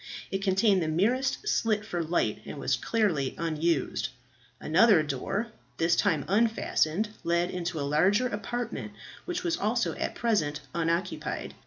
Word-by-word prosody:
It 195 - -1
contained 195 0 +3
the 160 - -1
merest 235 +12 +1
slit 215 -2 +1
for 175 -5 -2
light, 165 +2 0
and - - -8
was - - +1
clearly 175 - 0
unused. 165 -1 0 0.5
Another 185 +1 +5
door, 150 - -2 0.3
this 165 +1 +3
time 165 -8 +1
unfastened, 210 -3 +1
led 170 +1 +1
into 175 -2 -3
a 140 - -1
larger 185 - +3
apartment, 240 +2 -4 0.3
which 360 0 -3
was 335 -2 0
also 230 +3 0
at - - -3
present 155 -11 0
unoccupied. 170 +2 -2
190 Hz, 140 wpm, -28 LUFS, 165-225 Hz, 0.5 s, Another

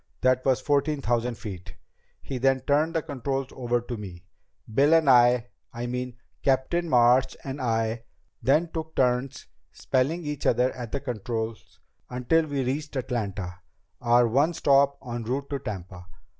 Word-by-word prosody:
That 130 0 +3
was 130 -1 +2
fourteen 145 +1 +1
thousand 120 -2 0
feet. 95 -4 -8 0.5
He 130 -2 -4
then 135 +1 +2
turned 150 +5 +1
the 160 - +1
controls 135 -2 -3
over 120 -1 -1
to 120 0 -6
me. 90 -4 -9 0.5
Bill 145 +7 +5
and 160 -3 +3
I 120 -2 +5 0.2
I 120 +1 -4
mean, 125 0 -4 0.3
Captain 140 +6 +1
March 125 0 +4
and 135 +1 -5
I 115 -1 -1 0.4
then 150 +8 +3
took 160 -1 -6
turns 125 +1 0 0.3
spelling 150 +6 -1
each 150 -1 -3
other 125 +1 +3
at 120 -3 -7
the 140 - -2
controls 115 -3 -5 0.3
until 155 +6 +1
we 140 -2 -1
reached 145 +4 -3
Atlanta, 100 -8 -3 0.4
our 120 0 +4
one 145 +9 +2
stop 140 -1 +3
en 120 0 -3
route 135 +5 -3
to 140 - -1
Tampa. 90 -5 -7
130 Hz, 155 wpm, -26 LUFS, 120-140 Hz, 0.5 s, Bill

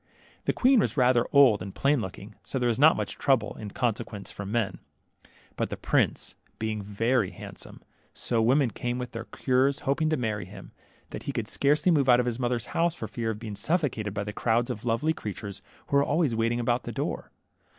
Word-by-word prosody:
The - - +3
queen 255 0 +4
was 190 - 0
rather 125 -2 +4
old 130 -8 +6
and 95 +1 -7
plain 140 -2 +2
looking, 95 +1 -7
so - - -4
there 125 -1 +1
was 115 - -1
not 155 +3 +6
much - - -4
trouble, 130 -6 +2
in 105 -2 -6
consequence, 110 -3 -3
from 100 0 -6
men; 110 -5 -1 0.8
but - - -1
the - - -5
prince - - 0 0.2
being 110 -1 -2
very 105 +2 0
handsome, - - -11 0.3
so 120 - -2
many 110 - +3
women 130 -1 +3
came 120 +2 -3
with 125 -1 -5
their 115 -1 -6
cures, 130 +2 +1
hoping 155 +3 +1
to 155 - +1
marry 110 -5 -2
him, 95 +1 -12 0.4
that - - -6
he - - +1
could - - -3
scarcely 150 +5 +2
move 140 -5 +3
out 120 0 +7
of 125 - +1
his 120 0 -2
mother's 120 -2 -1
house 170 0 +1
for 110 - -5
fear 115 +1 -3
of 110 - -2
being 105 -2 -6
suffocated 120 - -1
by 100 - -1
the 105 +1 -6
crowds 120 +3 +1
of 115 -1 -7
lovely 120 +7 +1
creatures 100 -6 -7 0.2
who 140 - +1
were 140 - +5
always 145 -3 +1
waiting 115 +1 0
about 120 +1 +1
the - - -6
door. - - -3
120 Hz, 215 wpm, -27 LUFS, 110-135 Hz, 0.8 s, out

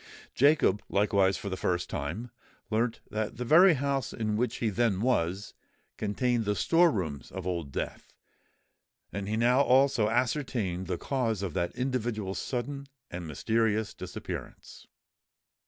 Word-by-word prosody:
Jacob, 140 -8 +4
likewise 100 -2 +2
for - - -7
the 95 - -2
first 90 -1 -1
time, 90 +11 -4 0.4
learnt 115 +2 0
that 110 +1 -3
the 125 - -3
very 170 +6 +7
house 140 -2 -1
in 110 -2 -1
which 120 +3 0
he 115 - 0
then 110 -2 +1
was, 100 -5 0 0.4
contained 120 +3 0
the 105 -1 0
store 170 +7 +4
rooms 80 - -3
of 95 -1 -7
Old 85 -6 -3
Death; - - -5 1.0
and 100 -1 -4
he 110 - 0
now 125 +4 +4
also 130 -5 +4
ascertained 115 -7 -1
the 90 - -2
cause 115 -6 -1
of 95 - -3
that 85 -2 -2
individual's 120 -6 -2
sudden 140 +2 -4 0.2
and 85 -1 -5
mysterious 110 +7 0
disappearance. - - -8
110 Hz, 140 wpm, -29 LUFS, 95-125 Hz, 1.0 s, very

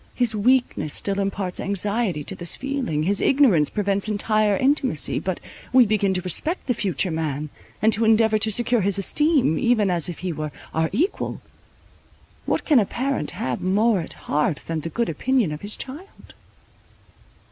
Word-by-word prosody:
His 245 -3 +2
weakness 240 - +1
still 200 0 -1
imparts 195 -2 -3
anxiety 200 -3 -1
to 195 - -2
this 175 -3 +1
feeling, 265 - -2
his 195 +4 +2
ignorance 235 - +4
prevents 200 -1 -1
entire 215 -1 +1
intimacy; 265 - +1
but 185 -2 -3 0.3
we 255 -1 +6
begin 205 -2 +1
to 180 - -1
respect 310 - -1
the 250 - +1
future 190 - -1
man, 155 -2 -3 0.3
and 220 +1 +5
to 220 - +1
endeavour 220 -1 +3
to 220 +1 +1
secure 240 +1 +2
his 195 0 0
esteem, 275 - +2
even 220 -5 +2
as 175 -1 0
if 175 - -6
he 180 - -1
were 155 0 -5 0.2
our 160 0 0
equal. 320 - -1 1.1
What - - -1
can 295 -6 +5
a 210 - +2
parent 260 - -2 0.2
have 125 -2 -3
more 205 +3 +2
at 165 - -6
heart 150 0 -2
than 165 -1 -3
the 165 - -5
good 235 +6 -1
opinion 235 - 0
of 150 - -6
his 205 +1 -5
child? 305 +10 -10
205 Hz, 170 wpm, -23 LUFS, 175-240 Hz, 1.1 s, we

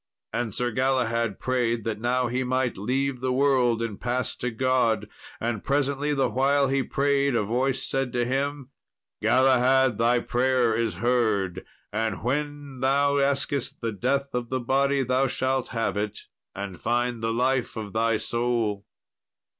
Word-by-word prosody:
And 120 -2 -1
Sir 120 +4 -1
Galahad 115 -4 0
prayed 120 -3 0
that 110 -1 -3
now 125 +1 +1
he 125 +2 -1
might 130 -1 0
leave 130 +5 -1
the 130 0 0
world 125 -3 +2
and 110 -4 -5
pass 125 +1 -1
to 125 - -2
God. 125 -1 +1 0.3
And 115 -2 -2
presently, 140 +1 0
the 135 -3 +2
while 135 +3 +2
he 135 0 +2
prayed, 140 0 +1
a 110 - +2
voice 130 +5 0
said 135 -2 -1
to 120 -1 +1
him, 135 +1 -2 0.5
"Galahad, 130 -2 +3
thy 120 +1 +3
prayer 120 -1 +1
is 115 -1 -1
heard, 110 -7 0 0.3
and 110 +1 -2
when 145 +1 -3
thou 140 +2 +2
asketh 140 -1 0
the 115 -1 -2
death 135 +6 -1
of 120 -1 -2
the 130 - -1
body 135 +2 +1
thou 130 +2 +2
shalt 130 0 -1
have 115 -3 -2
it, 105 0 -3 0.3
and 95 -3 -6
find 120 -1 0
the 115 0 0
life 125 +2 0
of 105 -2 -6
thy 115 0 +2
soul." 115 -4 -1
125 Hz, 155 wpm, -26 LUFS, 115-135 Hz, 0.5 s, Galahad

